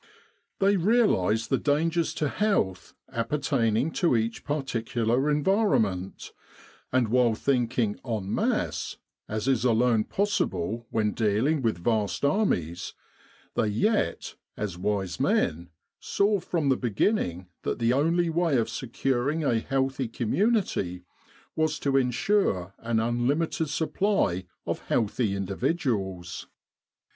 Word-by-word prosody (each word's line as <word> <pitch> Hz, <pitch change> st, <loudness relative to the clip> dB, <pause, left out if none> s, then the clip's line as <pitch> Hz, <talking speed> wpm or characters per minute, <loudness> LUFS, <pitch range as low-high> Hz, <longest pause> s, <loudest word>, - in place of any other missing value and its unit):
They 200 Hz, +1 st, +3 dB
realised 165 Hz, -, +2 dB
the 135 Hz, -, +3 dB
dangers 160 Hz, +3 st, +1 dB
to 150 Hz, -, 0 dB
health 130 Hz, -, -1 dB
appertaining 125 Hz, 0 st, 0 dB
to 170 Hz, -7 st, +2 dB
each 115 Hz, +1 st, -2 dB
particular 125 Hz, -2 st, 0 dB
en 150 Hz, 0 st, +1 dB
vironment; 110 Hz, -, +1 dB, 0.6 s
and 125 Hz, -3 st, +2 dB
while 120 Hz, -1 st, +3 dB
thinking 120 Hz, -4 st, 0 dB
en 110 Hz, -6 st, -3 dB
masse -, -, -1 dB, 0.3 s
as 110 Hz, +3 st, -3 dB
is 130 Hz, -4 st, +2 dB
alone 115 Hz, -2 st, +3 dB
possible 115 Hz, -, -1 dB
when 105 Hz, -1 st, +1 dB
dealing 115 Hz, +9 st, +1 dB
with 115 Hz, -7 st, 0 dB
vast 110 Hz, +2 st, 0 dB
armies 115 Hz, -, 0 dB, 0.6 s
they 110 Hz, -, +1 dB
yet, 105 Hz, -, 0 dB, 0.2 s
as 105 Hz, -4 st, -3 dB
wise 95 Hz, -1 st, -2 dB
men, 85 Hz, +3 st, +1 dB, 0.3 s
saw 200 Hz, 0 st, +1 dB
from 165 Hz, -5 st, -1 dB
the 130 Hz, -, +3 dB
beginning 100 Hz, -, 0 dB, 0.2 s
that -, -, -2 dB
the 115 Hz, +1 st, +2 dB
only 165 Hz, +5 st, +2 dB
way 165 Hz, -4 st, +2 dB
of 115 Hz, -1 st, 0 dB
securing 130 Hz, +5 st, -1 dB
a 120 Hz, -5 st, +2 dB
healthy 135 Hz, +1 st, -1 dB
community 115 Hz, -, 0 dB, 0.5 s
was 155 Hz, -1 st, +1 dB
to 140 Hz, -1 st, 0 dB
ensure 125 Hz, -, +1 dB
an 115 Hz, -1 st, 0 dB
unlimited 135 Hz, +8 st, 0 dB
supply 150 Hz, -, 0 dB, 0.2 s
of -, -, -2 dB
healthy 110 Hz, -2 st, 0 dB
individuals. 100 Hz, -, -2 dB
125 Hz, 115 wpm, -27 LUFS, 105-155 Hz, 0.6 s, They